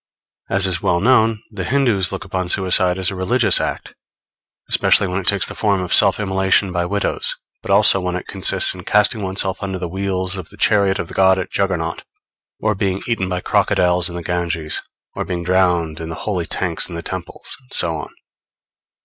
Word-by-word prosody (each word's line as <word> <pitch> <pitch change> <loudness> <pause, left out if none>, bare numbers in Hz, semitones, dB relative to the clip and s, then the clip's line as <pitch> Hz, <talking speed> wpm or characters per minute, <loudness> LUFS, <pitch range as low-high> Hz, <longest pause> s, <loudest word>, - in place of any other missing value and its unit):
As 95 0 +2
is 90 -2 -1
well 85 - +1
known, 110 0 +2
the 100 -4 -5
Hindoos 110 -4 +1
look 95 0 -6
upon 95 -2 -3
suicide 90 -1 +3
as 95 +1 0
a - - -6
religious 110 +6 +3
act, - - -4 0.7
especially - - +3
when 90 +1 -2
it 90 - -12
takes 100 -2 +3
the - - -7
form 100 -3 0
of 90 - -2
self - - +5
immolation 95 -1 +1
by 90 -1 -1
widows; 100 +2 -1 0.3
but - - -11
also 100 0 +5
when 90 0 -3
it 90 - -5
consists 95 -2 +2
in - - -11
casting 105 +1 +2
oneself 95 0 -1
under 95 -2 -4
the 90 -1 -4
wheels 95 +1 -3
of 90 -4 -8
the - - -16
chariot 100 -3 +2
of - - -4
the - - -11
god 95 0 +4
at 95 - -5
Juggernaut, 85 -4 -2 0.6
or 110 0 0
being 95 -1 -2
eaten 105 -6 -1
by 90 0 -2
crocodiles 90 0 +2
in 85 - -8
the 85 - -5
Ganges, 85 -3 -1 0.3
or - - -4
being 85 -1 -4
drowned 90 -3 +1
in 80 0 -6
the 80 - -5
holy 90 -6 -2
tanks 90 -2 -2
in 85 - -7
the 85 - -6
temples, - - -6
and 65 - -28
so - - +1
on. - - -7
95 Hz, 200 wpm, -19 LUFS, 90-100 Hz, 0.7 s, self